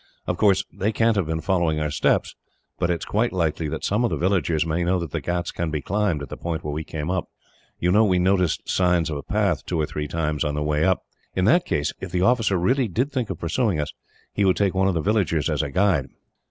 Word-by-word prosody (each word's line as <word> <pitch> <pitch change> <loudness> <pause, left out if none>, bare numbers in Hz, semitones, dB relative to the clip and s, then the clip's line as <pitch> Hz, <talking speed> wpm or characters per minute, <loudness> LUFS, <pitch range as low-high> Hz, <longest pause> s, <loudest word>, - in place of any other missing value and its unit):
Of - - -1
course, 100 -2 +3
they 105 +3 0
can't 115 +1 +2
have 95 -5 0
been 80 0 -2
following 85 -5 +1
our 75 -1 -1
steps, - - +1 0.5
but 85 - +1
it 85 -2 0
is - - -5
quite 115 +4 0
likely 80 -3 -1
that - - -5
some 105 +4 +1
of 120 - +2
the - - -2
villagers 85 -4 +1
may 80 +2 0
know 90 +2 +2
that 85 -4 -4
the - - -2
ghauts 90 0 -2
can 85 -1 -3
be 75 -1 -2
climbed 90 -1 -1
at 70 - -8
the - - -7
point 85 -2 -4
where 75 - -3
we 80 +2 -3
came 80 +2 -4
up. 95 -2 -2 0.5
You 90 - +1
know 105 +4 +5
we 95 -4 +3
noticed 90 -2 +1
signs 90 -3 +2
of 75 - -2
a - - -5
path, 100 -4 0
two 85 - -2
or 75 - +2
three 75 0 -4
times, 75 -1 -1
on 75 -1 -1
the 75 - -1
way 75 0 +1
up. 95 -1 +2 0.3
In 95 - +1
that 170 - +4
case, 75 0 0
if 95 - -6
the 90 - 0
officer 115 -4 +3
really 125 +8 +2
did 125 - -1
think 125 -6 -2
of 95 - -4
pursuing 90 +2 0
us, 75 - -3 0.4
he 100 - +1
would 95 -2 +3
take 100 -2 +2
one 95 0 +2
of 95 - +1
the 80 - 0
villagers 85 - +1
as - - +1
guide." 85 -2 +1
90 Hz, 260 wpm, -23 LUFS, 80-100 Hz, 0.5 s, know